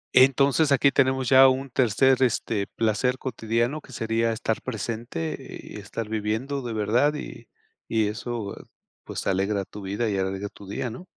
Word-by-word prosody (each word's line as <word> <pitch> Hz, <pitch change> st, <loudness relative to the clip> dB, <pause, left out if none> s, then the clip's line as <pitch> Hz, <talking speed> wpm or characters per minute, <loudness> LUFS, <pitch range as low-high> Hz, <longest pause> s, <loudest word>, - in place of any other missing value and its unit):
Entonces 140 Hz, +3 st, +5 dB
aquí 140 Hz, 0 st, +5 dB
tenemos 130 Hz, -1 st, +2 dB
ya 130 Hz, +2 st, +8 dB
un 130 Hz, +1 st, 0 dB
tercer, 130 Hz, +2 st, +3 dB
este, 110 Hz, -5 st, +1 dB
placer 115 Hz, +3 st, 0 dB
cotidiano 120 Hz, +3 st, -1 dB
que 130 Hz, -, -16 dB
sería 115 Hz, 0 st, 0 dB
estar 110 Hz, 0 st, -2 dB
presente, 110 Hz, -8 st, -4 dB, 0.3 s
y -, -, -9 dB
estar 105 Hz, +2 st, -5 dB
viviendo 110 Hz, +6 st, -2 dB
de 120 Hz, -, -5 dB
verdad, 115 Hz, +8 st, +2 dB
y 150 Hz, -, -8 dB, 0.4 s
y 110 Hz, -2 st, +2 dB
eso, 110 Hz, -1 st, -4 dB, 0.5 s
pues, -, -, -6 dB
alegra 100 Hz, +1 st, 0 dB
tu 105 Hz, -, -10 dB
vida 100 Hz, +4 st, -2 dB
y 100 Hz, -, -1 dB
alegra 95 Hz, +1 st, -2 dB
tu 100 Hz, -, -14 dB
día, 105 Hz, +5 st, -3 dB
¿no? 125 Hz, +11 st, -9 dB
115 Hz, 160 wpm, -25 LUFS, 105-130 Hz, 0.5 s, ya